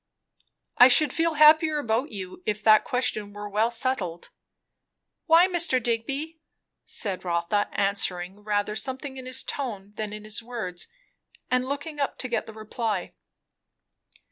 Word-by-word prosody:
"I 245 - +10
should 265 +2 +5
feel 330 -1 0
happier 310 +1 +6
about 245 +1 -1
you, 195 - -8
if 210 0 -2
that 215 -1 +6
question 215 -5 -1
were 205 0 -7
well 210 +3 +1
settled." 230 -8 -1 1.0
"Why, 335 +2 +6
Mr. 340 -8 +2
Digby?" 275 +8 -3 0.4
said 195 -3 -1
Rotha, 175 +4 -1
answering 195 -1 -1
rather 210 0 -1
something 265 +4 -3
in 255 -1 -8
his 255 - -1
tone 205 -7 -5
than 215 -2 -4
in 210 0 -8
his 215 +1 -3
words, 225 -7 -6 0.6
and 255 +1 +1
looking 290 +2 -5
up 280 - -2
to 255 - -2
get 240 - -2
the 220 - -9
reply. 215 -2 -4
230 Hz, 145 wpm, -25 LUFS, 205-275 Hz, 1.0 s, I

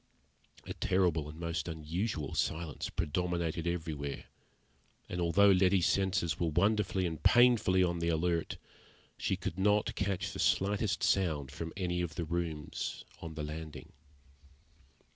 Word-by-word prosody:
A - - -5
terrible 90 -5 +1
and 75 +2 -10
most 85 0 -3
unusual 80 0 -3
silence 80 -1 -2
predominated 85 +1 -1
everywhere, 80 -5 -3 0.8
and 90 - -3
although 100 +4 +5
Letty's 95 -1 +4
senses 95 -5 +1
were 85 - +1
wonderfully 95 +2 +1
and 80 -3 -4
painfully 120 -6 +5
on 85 -1 0
the 85 0 0
alert, 85 +1 0 0.6
she - - 0
could 90 - -5
not 105 +2 +2
catch 100 -2 -2
the - - -7
slightest 100 +1 +1
sound 80 -8 +1
from 80 +2 -5
any 90 -2 -1
of 85 -3 -4
the 85 - -2
rooms 80 -2 -3 0.2
on 80 -1 -7
the 75 - -4
landing. 75 +1 -7
85 Hz, 135 wpm, -32 LUFS, 80-95 Hz, 0.8 s, although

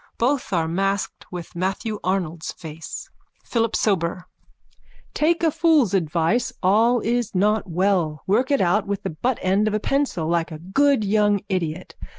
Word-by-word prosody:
Both 255 +1 0
are 165 -3 +1
masked 195 +4 -2
with 175 -2 -7
Matthew 195 +4 -2
Arnold's 175 -3 -2
face.)_ 160 0 -8 0.4
PHILIP 230 -2 0
SOBER: 180 -3 0 0.9
Take 335 +2 +1
a 325 - +4
fool's 315 - +3
advice. 170 +5 +1
All 225 +6 +4
is 235 -2 -1
not 210 +1 +1
well. 175 -4 0
Work 230 +7 +2
it 280 -1 +2
out 195 +3 +2
with 200 +1 -3
the 190 - -3
buttend 205 +1 0
of 215 - 0
a - - +1
pencil, 260 - -1
like 170 0 0
a 155 - -6
good 220 - +2
young 205 -1 +2
idiot. 180 -2 -3
195 Hz, 155 wpm, -23 LUFS, 175-230 Hz, 0.9 s, a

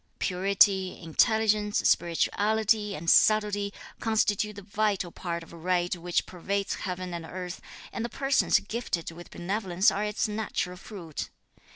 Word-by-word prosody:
Purity, 190 0 +2
intelligence, 210 +5 +2
spirituality 210 +4 +2
and 165 +2 -7
subtlety 205 +1 +4 0.3
constitute 210 -1 +1
the 200 - -9
vital 200 -3 -1
spirit 170 -1 -4
of 165 - -15
right 175 +1 0
which 175 0 -1
pervades 195 +2 -2
heaven 180 -1 -4
and 170 -1 -4
earth, 180 +2 -6 0.3
and 230 - -3
the 235 - -3
persons 270 +1 +3
gifted 200 -6 -3
with 175 +1 -11
benevolence 190 +2 +1
are 205 - -1
its 210 +1 0
natural 210 -4 -2
fruit. 180 -5 -7
195 Hz, 135 wpm, -28 LUFS, 175-210 Hz, 0.3 s, subtlety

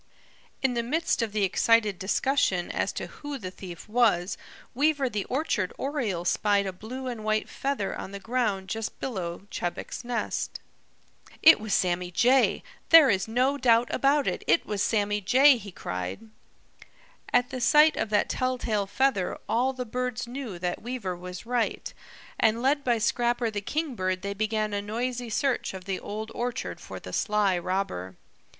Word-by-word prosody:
In 265 -2 +2
the 235 - 0
midst 300 +4 0
of 225 -2 -1
the 210 -1 0
excited 210 +1 +3
discussion 190 -3 +1
as - - -1
to - - -4
who 290 -1 -7
the 185 -7 -6
thief 180 -1 -10
was, 210 -6 +2 0.4
Weaver 280 0 +2
the 205 -1 -2
Orchard 250 - -1
Oriole 235 - -2
spied 205 +2 +2
a 190 - -3
blue 240 +8 -7
and 240 -4 -5
white 215 0 0
feather 270 -8 -2
on - - -6
the 200 - -6
ground 215 -3 -1
just 220 +2 -4
below 185 -7 -4
Chebec's 175 +6 -4
nest. 240 0 -3 0.8
"It 320 -4 +9
was 215 -1 -1
Sammy 180 -1 0
Jay! 250 +9 +3 0.3
There 320 -6 +9
is 190 0 0
no 255 +5 +1
doubt 235 -1 +3
about 280 +1 +3
it, - - -2
it - - +3
was 205 -2 -2
Sammy 205 -1 +1
Jay!" 260 +7 +6
he 205 -4 -9
cried. 90 - -5 1.0
At 245 0 +2
the 255 - -4
sight 300 +5 +6
of - - -2
that 210 -1 +2
telltale 245 -5 -1
feather 205 -5 +1
all 250 +3 +2
the 255 -1 -5
birds 250 +1 -3
knew 240 -6 -6
that 175 0 -3
Weaver 235 -6 -4
was 180 +3 -8
right, 240 -1 -1 0.5
and 225 +2 +2
led 285 +2 +2
by 240 -2 +2
Scrapper 235 +1 +1
the 205 -1 -3
Kingbird 200 - -2
they 200 0 -2
began 215 0 -1
a 200 - -1
noisy 240 +3 -3
search 250 -2 0
of 185 -1 -9
the 190 -2 -2
Old 215 +2 -6
Orchard 245 0 -3
for - - -8
the - - -10
sly 210 -3 +2
robber. 175 - -3
220 Hz, 170 wpm, -27 LUFS, 195-255 Hz, 1.0 s, It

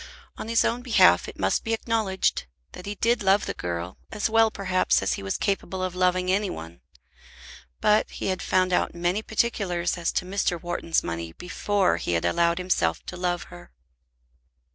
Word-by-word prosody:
On - - -7
his 230 0 +3
own 240 +2 0
behalf 245 -2 +5
it - - -9
must - - 0
be 225 - -1
acknowledged 220 - 0 0.2
that 180 - -10
he 205 - -4
did 235 +3 +1
love 195 +1 +3
the - - -3
girl, 85 +1 -5
as 215 +1 -1
well 225 0 +5
perhaps 190 - +1
as 95 - +1
he - - -4
was 95 0 -2
capable 190 -1 -2
of 185 -1 -2
loving 185 0 +1
any 200 +1 +1
one; 85 - -8 1.0
but 210 0 +3
he - - -6
had 185 -1 -1
found 185 -1 +1
out - - +1
many 175 +4 0
particulars 195 -6 -1
as 170 - 0
to - - -1
Mr. 185 -2 -1
Wharton's 165 -1 -1
money 85 0 -5
before 190 - 0
he 85 - -2
had 85 0 0
allowed 170 - +2
himself 175 - 0
to - - -7
love 180 -1 -1
her. 85 -8 -13
185 Hz, 185 wpm, -25 LUFS, 170-205 Hz, 1.0 s, behalf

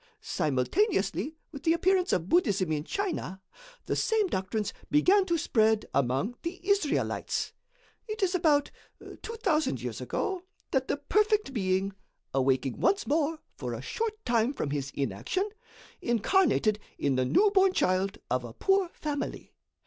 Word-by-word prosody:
Simultaneously 180 - 0 0.2
with 280 -3 -8
the 325 +2 +3
appearance 370 +2 +2
of 175 -1 0
Buddhism 195 - +2
in 150 -1 0
China, 340 - -3 0.5
the - - -1
same 445 -2 +2
doctrines 210 - -2 0.2
began 370 +7 +4
to 340 -2 +2
spread 220 -7 +2
among 135 - +1
the 345 +2 -5
Israelites. 400 -7 0 0.5
It 430 -1 -3
is 370 -1 +2
about 305 -5 +3 0.5
2,000 380 -9 0
years - - -5
ago 375 -2 -2 0.3
that 265 -2 +1
the - - 0
perfect 420 - +1
Being, 190 -2 0 0.4
awaking 135 -1 +1
once 400 +1 +2
more 315 +1 +1 0.2
for - - -5
a - - -6
short 440 -2 -3
time 235 +2 +2
from 145 - -3
his 140 -2 -2
inaction, 135 - -1 0.5
incarnated 235 - +2 0.2
in 140 - +1
the 130 - +2
newborn 390 - +4
child 190 - +1
of 125 0 +1
a 120 -2 -8
poor 385 - +2
family. 290 -2 -4
285 Hz, 140 wpm, -29 LUFS, -, 0.5 s, began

